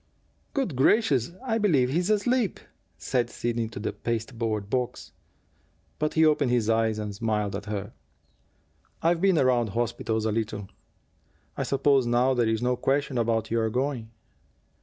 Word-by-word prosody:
"Good 265 - -1
gracious, 135 - +3
I 230 -3 0
believe 145 - +3
he's 175 +6 0
asleep!" 215 0 +1 0.4
said 120 +8 -1
Sidney 120 -1 -2
to 110 - -8
the 105 - -3
pasteboard 115 -2 -3
box. 125 +2 -3 0.9
But 155 0 -1
he 160 0 +5
opened 150 -4 +3
his 120 -2 +2
eyes 110 -1 +1
and 105 -1 -4
smiled 105 -1 -1
at 100 +1 -6
her. 105 -1 -4 1.1
"I've 165 +1 +2
been 190 -3 +4
around 125 -4 +3
hospitals 110 0 -1
a 110 - +1
little. 105 -2 -3 0.9
I - - -3
suppose 135 -2 +2
now 125 +2 +3
there 120 -3 +1
is 110 +1 0
no 125 0 +2
question 135 -1 0
about 115 -1 0
your 115 -1 +1
going?" 125 -1 -2
120 Hz, 150 wpm, -26 LUFS, 110-145 Hz, 1.1 s, he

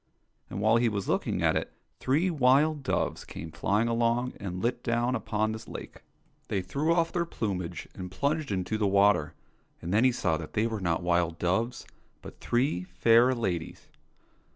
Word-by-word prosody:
And 95 - -5
while 110 +2 +4
he 120 0 +3
was 100 -2 -3
looking - - 0
at - - +3
it, - - -2 0.3
three 160 +8 +1
wild 145 +1 +3
doves 130 - -1
came 80 0 -8
flying 105 +7 +1
along 115 +2 +1
and 90 -2 -5
lit 120 +6 -1
down 120 +1 0
upon 110 -2 -1
this 110 +1 -7
lake. - - -9 0.5
They 95 -2 -1
threw 150 - -1
off 170 -1 +2
their 175 - 0
plumage 90 - -4
and 90 -1 -7
plunged 140 - -1
into 95 +3 -2
the 105 - +2
water, 100 -6 +3 0.4
and 85 +3 -4
then 110 +4 +4
he 130 - +5
saw 80 -9 0
that 80 -2 -8
they 110 - +1
were 110 -3 -3
not 85 -1 0
wild 85 -1 +1
doves, 95 +9 -1 0.4
but - - -11
three 120 -7 0
fair 115 +8 +4
ladies. 90 -8 -4
110 Hz, 175 wpm, -28 LUFS, 90-125 Hz, 0.5 s, he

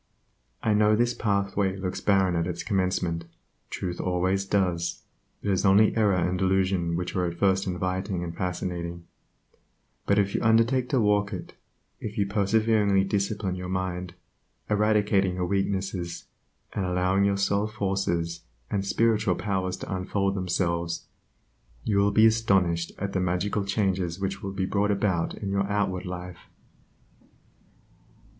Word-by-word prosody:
I 110 - +3
know 105 0 +4
this 120 +2 +2
pathway 100 -3 0
looks 95 0 -4
barren 95 -3 +3
at 85 0 0
its 85 -2 -4
commencement 90 -4 -1 0.4
(truth 90 -2 -4
always 95 +2 0
does, 90 -4 0 0.4
it 100 - 0
is 95 - +1
only 100 +2 +5
error 105 -4 +3
and 90 +1 0
delusion 95 -3 +1
which 90 +1 -3
are 90 -1 +1
at 85 0 -5
first 95 +1 +2
inviting 90 0 -2
and 85 -1 -5
fascinating,) 85 -2 -4 1.0
but 100 - +3
if 100 -1 +2
you - - 0
undertake 115 +3 +3
to 135 - +2
walk 105 -1 +2
it; 90 - -7 0.5
if 105 -1 -6
you 100 - +2
perseveringly 100 0 +2
discipline 100 0 -1
your 90 0 -5
mind, 90 -1 -3 0.6
eradicating 105 -3 +2
your 90 -1 -1
weaknesses, 95 -2 -2 0.5
and 100 - -1
allowing 90 +2 +1
your 100 0 +2
soul 100 +1 +1
forces 95 -6 -1 0.3
and 100 -1 0
spiritual 105 -1 +2
powers 95 -2 -2
to - - -4
unfold 95 +1 -1
themselves, 85 -3 -1 0.8
you 100 -2 +1
will 100 +1 +4
be 110 +2 +5
astonished 95 -7 +2
at 100 0 -4
the 95 - +1
magical 90 +3 0
changes 95 -3 -1
which 95 0 -3
will 100 - -4
be 95 -1 -2
brought 100 +2 +1
about 100 -4 0
in 100 -2 -4
your 100 0 0
outward 100 -3 -1
life. 90 -1 -7
95 Hz, 145 wpm, -26 LUFS, 90-100 Hz, 1.0 s, only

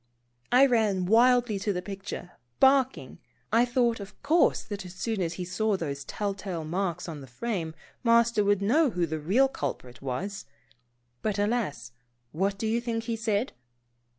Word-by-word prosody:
I 255 +3 +7
ran 215 -7 +2
wildly 235 +1 +4
to 205 +1 -1
the 180 -2 -3
picture, 195 -2 -7 0.3
barking. 265 -1 +3 0.3
I 235 +2 +5
thought, 240 -2 +1
of 200 0 -10
course, 330 +2 +3
that 205 -2 -6
as 180 0 -10
soon 220 0 -2
as 170 -1 -1
he 180 +1 -5
saw 205 +3 0
those 145 -5 -4
telltale 195 -5 -4
marks 175 +1 -2
on 155 -4 -6
the 135 - -10
frame. 165 - -4 0.3
Master 235 -2 +4
would 200 -1 +2
know 285 +9 +4
who 180 -5 0
the 160 -1 -4
real 205 - +3
culprit 130 - -5
was. 180 +11 -4 0.8
But 210 -2 -1
alas, 205 - -1 0.4
what 195 +5 -1
do 220 - -3
you 225 +2 +1
think 230 -1 -2
he 230 0 -2
said 225 +1 -1
205 Hz, 165 wpm, -28 LUFS, 180-235 Hz, 0.8 s, I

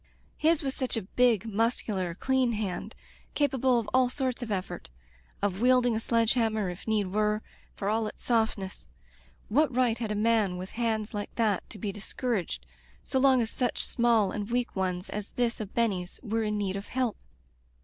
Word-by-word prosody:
His 320 0 +2
was 270 -1 -1
such 255 -3 -1
a 220 - -2
big, 230 +1 +2
mus 225 +2 +1
cular, 185 -5 -2
clean 260 -1 +2
hand 205 -4 -3 0.2
— - - -29
capable 265 -4 +3
of 225 - -5
all 255 -1 +4
sorts 260 -1 -2
of 235 -3 -4
effort 190 -2 -3 0.3
— 60 0 -32
of 200 0 0
wielding 250 -1 +4
a - - +1
sledge 230 0 +2
hanuner, 220 -5 +1
if 180 +5 -11
need 215 -2 +2
were, 210 0 +1 0.3
for 195 - -3
all 220 +1 +1
its - - -9
softness. 220 - 0 0.6
What 290 +7 +3
right 240 -2 +2
had 225 -3 -2
a - - 0
man 210 -4 +2
with 185 +1 -6
hands 220 -2 -1
like 205 -1 -4
that 215 -5 +1
to - - -10
be 205 +1 -3
discouraged, 200 - -3 0.4
so 265 - 0
long 260 -2 +5
as 225 - -3
such 245 -2 -1
small 230 -4 +3
and 210 0 -4
weak 245 0 -1
ones 185 -1 -1
as 210 0 -5
this 240 -2 0
of 215 -2 -6
Benny's 195 -6 0
were 225 -1 0
in 210 -1 0
need 195 -2 -1
of 200 - -7
help 250 -4 0
220 Hz, 195 wpm, -29 LUFS, 205-245 Hz, 0.6 s, long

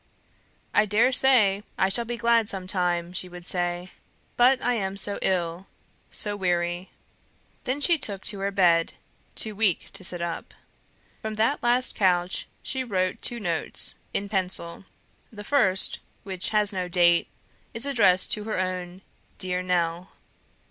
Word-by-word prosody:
"I 210 +1 +3
dare 220 +5 +3
say 235 -7 +4 0.2
I - - +3
shall 235 +5 +1
be 240 +1 -4
glad 230 -2 +2
some 190 -2 -2
time," 180 -2 -1
she 185 0 -4
would 175 -1 -11
say; 175 0 -2 0.4
"but 255 +2 +4
I 245 - +2
am 195 -4 -3
so 200 0 +3
ill 175 0 0 0.4
so 205 -1 -4
weary 175 -1 -1 0.4
" - - -38
Then 260 +3 -1
she 335 +1 +4
took 200 -7 -3
to 205 - -2
her 195 +1 -1
bed, 175 -4 +2 0.4
too 215 -2 0
weak 200 -5 +1
to - - -12
sit 180 -1 +2
up. 170 -1 -5 0.7
From 220 0 -4
that 225 +7 +1
last 245 +1 +2
couch 180 -2 +1 0.2
she 260 -1 -3
wrote 185 -6 -2
two 240 - -2
notes 170 -6 -3 0.2
in 200 - -2
pencil. 185 -3 0 0.5
The 205 -2 -9
first, 205 -7 +4 0.2
which 190 -2 -4
has 210 -1 +1
no 185 -1 -2
date, 175 -1 +3 0.4
is 230 +3 -1
addressed 205 -10 +3
to 210 -1 -2
her 220 - -3
own 185 0 -4 0.3
"Dear 180 -1 -3
Nell." 175 0 -1
190 Hz, 155 wpm, -25 LUFS, 180-220 Hz, 0.7 s, say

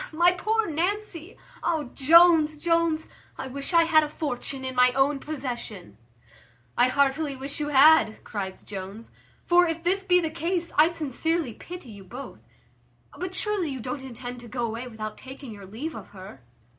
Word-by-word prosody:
my 345 +3 +4
poor 435 +5 0
Nancy! 350 +2 -3 0.2
Oh! 320 -6 -1
Jones, 320 +1 +6
Jones, 335 0 +1 0.3
I - - -5
wish 275 +4 -4
I 335 -1 +6
had 325 -1 +5
a 300 - -3
fortune 270 -2 -4
in 260 - -3
my 250 0 +5
own 275 +2 +2
possession." 250 - -6 0.8
"I 245 - +4
heartily 280 +2 +1
wish 275 +3 -6
you 295 - -2
had," 295 -5 +5
cries 190 -3 -5
Jones; 200 +3 -8 0.3
"for, 350 0 +5
if 330 0 -3
this 380 +3 +1
be 360 -2 +4
the 320 -2 -2
case, 340 +2 -2
I 305 +2 +6
sincerely 320 -3 -2
pity 345 -6 -10
you 200 -2 -11
both; 245 +8 -9 0.8
but 365 +1 -5
surely 410 -5 0
you 265 -2 -5
don't 250 +4 -5
intend 245 -1 -8
to 240 - -11
go 240 0 -2
away 230 +2 -5
without 215 -2 -7
taking 265 -1 -10
your 200 -2 -10
leave 265 +11 -5
of - - -9
her?" 185 -8 -11
290 Hz, 170 wpm, -26 LUFS, 245-335 Hz, 0.8 s, Jones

